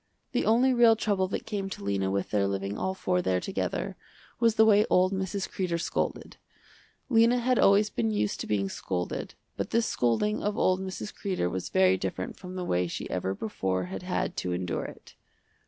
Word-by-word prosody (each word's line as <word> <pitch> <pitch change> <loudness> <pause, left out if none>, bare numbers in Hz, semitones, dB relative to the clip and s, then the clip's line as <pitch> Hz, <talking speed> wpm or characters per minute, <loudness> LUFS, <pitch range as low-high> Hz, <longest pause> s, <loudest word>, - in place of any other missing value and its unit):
The - - 0
only 245 +4 +4
real 235 -2 +6
trouble 200 -4 0
that 190 - -4
came 200 -3 -3
to 150 - -7
Lena 100 -1 0
with 100 0 -2
their 100 -2 +2
living 100 +1 -2
all 190 - -2
four 180 -1 0
there 95 - +1
together, - - -3 0.4
was 230 -2 +3
the 220 - +6
way 210 -1 +6
old 185 +1 +3
Mrs. 190 +1 -2
Kreder 175 -3 -2
scolded. - - -3 0.7
Lena 235 -1 +4
had 250 +1 +2
always 205 +2 +5
been 115 -1 0
used 105 -1 -1
to - - -4
being 100 -2 0
scolded, 90 -2 -4 0.2
but - - -2
this 230 0 +2
scolding 125 - +1
of 205 0 -1
old 185 0 +2
Mrs. 190 +2 -5
Kreder 185 - -2
was 95 -1 -4
very 95 0 +4
different 95 -1 -4
from 185 -1 -9
the 180 -1 -3
way 90 - +1
she - - -5
ever 95 +1 -1
before 95 -3 -2
had 95 - -4
had - - -2
to 90 - -2
endure 90 -1 -2
it. - - -11
180 Hz, 195 wpm, -28 LUFS, -, 0.7 s, real